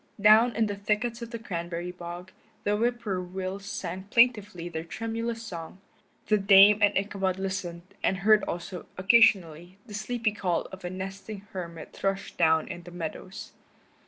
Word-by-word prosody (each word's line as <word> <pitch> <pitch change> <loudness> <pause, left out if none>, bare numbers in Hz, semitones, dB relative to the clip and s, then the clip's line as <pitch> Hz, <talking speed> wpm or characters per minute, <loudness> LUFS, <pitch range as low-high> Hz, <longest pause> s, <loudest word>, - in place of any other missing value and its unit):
Down 215 +4 +6
in 225 - +2
the 205 -1 -3
thickets 215 +4 -1
of 235 - -6
the 235 - -5
cranberry 175 -5 -4
bog 175 +1 -8 0.3
the 205 0 +1
whippoorwills 195 -4 -2
sang 190 -1 -5
plaintively 210 -7 +3
their 160 -2 -5
tremulous 225 +5 -4
song; 170 -5 -7 0.5
the 215 -1 +3
Dame 200 +2 +7
and 205 0 +4
Ichabod 195 -2 -1
listened, 185 -3 -4 0.2
and 190 - +1
heard 210 +1 +4
also, 175 +1 -5
occasionally, 185 -4 +3
the 215 - -11
sleepy 230 +1 -1
call 180 -5 -1
of 190 0 -10
a 175 - -3
nesting 195 +2 -6
hermit 170 -4 -7
thrush 195 0 -2
down 160 -1 +3
in 175 - -7
the 175 - -12
meadows. 175 +3 -7
195 Hz, 155 wpm, -28 LUFS, 175-215 Hz, 0.5 s, Dame